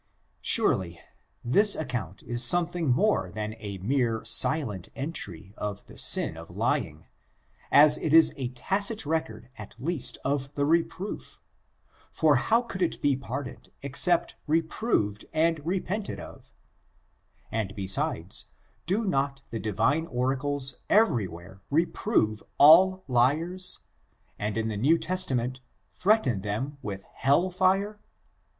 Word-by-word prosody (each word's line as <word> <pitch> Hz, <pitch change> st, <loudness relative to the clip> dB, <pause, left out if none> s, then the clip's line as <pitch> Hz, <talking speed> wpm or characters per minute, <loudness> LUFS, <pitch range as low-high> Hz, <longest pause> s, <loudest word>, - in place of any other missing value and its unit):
Surely, 85 Hz, -2 st, +1 dB, 0.5 s
this 200 Hz, -, +4 dB
account 110 Hz, -, -5 dB
is 120 Hz, +1 st, -1 dB
something 175 Hz, +3 st, +3 dB
more 125 Hz, -, +2 dB
than 105 Hz, +2 st, -4 dB
a 100 Hz, -3 st, -6 dB
mere 115 Hz, +2 st, -1 dB
silent 115 Hz, -, +2 dB
entry 100 Hz, -, -6 dB
of 105 Hz, -1 st, -5 dB
the -, -, -15 dB
sin -, -, +3 dB
of -, -, -10 dB
lying, -, -, -2 dB, 0.7 s
as 150 Hz, 0 st, +6 dB
it 155 Hz, -, -2 dB
is 160 Hz, +1 st, +6 dB
a 130 Hz, -4 st, -4 dB
tadi 200 Hz, -, -1 dB
record 130 Hz, -7 st, -3 dB
at 105 Hz, -, -10 dB
least 130 Hz, -4 st, -2 dB
of 140 Hz, 0 st, -1 dB
the 145 Hz, -, +1 dB
reproof) 170 Hz, +5 st, -2 dB, 0.7 s
for 155 Hz, -4 st, +3 dB
how 225 Hz, -, +2 dB
could 195 Hz, -6 st, -7 dB
it 175 Hz, -, 0 dB
be 145 Hz, -2 st, +2 dB
pardoned 135 Hz, +1 st, -7 dB
except 165 Hz, +5 st, +1 dB
reproved 155 Hz, -, 0 dB
and 160 Hz, -1 st, +1 dB
repented 190 Hz, +4 st, -3 dB
of -, -, -12 dB, 1.0 s
7 110 Hz, -2 st, -1 dB
And 100 Hz, -, -13 dB
be 95 Hz, -3 st, -5 dB
sides, 95 Hz, -, -2 dB, 0.4 s
do 210 Hz, +5 st, 0 dB
not 135 Hz, -5 st, -1 dB
the 115 Hz, -, -3 dB
Divine 115 Hz, +11 st, 0 dB
oracles 135 Hz, +1 st, -1 dB
every 195 Hz, -, +3 dB
where 90 Hz, +3 st, -12 dB
reprove 145 Hz, -, 0 dB, 0.2 s
all 185 Hz, +5 st, +7 dB
liars, 155 Hz, +9 st, +1 dB, 0.6 s
and 105 Hz, +1 st, -2 dB
in 110 Hz, 0 st, -1 dB
the 110 Hz, -2 st, -3 dB
New 145 Hz, +10 st, +3 dB
Testament 140 Hz, -8 st, -2 dB, 0.3 s
threaten 185 Hz, -, +2 dB
them 130 Hz, +9 st, -4 dB
with 100 Hz, -1 st, -6 dB
hell 145 Hz, +8 st, +1 dB
fire? 195 Hz, +3 st, +1 dB
140 Hz, 130 wpm, -27 LUFS, 110-170 Hz, 1.0 s, all